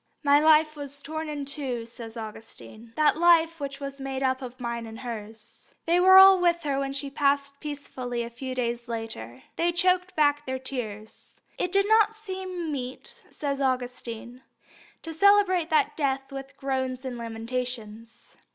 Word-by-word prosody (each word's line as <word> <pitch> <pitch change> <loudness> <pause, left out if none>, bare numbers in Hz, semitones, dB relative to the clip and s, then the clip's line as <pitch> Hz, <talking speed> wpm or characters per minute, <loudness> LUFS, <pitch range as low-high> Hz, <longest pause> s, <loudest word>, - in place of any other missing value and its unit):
"My 285 0 +5
life 310 0 +5
was 285 -1 -6
torn 315 +2 -5
in 290 -2 -4
two," 265 -5 -3
says 230 0 -10
Augustine. 220 - -10
"That 305 0 +3
life 330 -1 +4
which 275 -1 -5
was 275 -1 -6
made 270 0 -3
up 260 0 +1
of 255 0 -8
mine 235 -1 -4
and 225 +1 -9
hers." 225 -2 -9
They 340 +2 +3
were 375 +1 +8
all 385 0 +9
with 345 -1 +2
her 280 -2 0
when 275 0 -2
she 275 0 -3
passed 280 0 0
peacefully 260 -5 -5
away - - -3
a 235 - -9
few 260 +1 -5
days 240 -1 -2
later. 220 - -6
They 340 +1 +2
choked 365 +1 +1
back 290 -1 +3
their 260 0 -2
tears. 220 -5 -7 0.2
"It 360 - -1
did 395 +1 +3
not 440 0 +4
seem 375 -5 -5
meet," 255 -2 -7
says 280 -2 -3
Augustine, 250 -2 -3 0.6
"to 325 - -5
celebrate 370 -2 +4
that 310 - +2
death 270 -2 -1
with 270 0 -8
groans 260 -1 -2
and 255 -1 -4
lamentations. 230 -1 -6
275 Hz, 170 wpm, -26 LUFS, 240-315 Hz, 0.6 s, all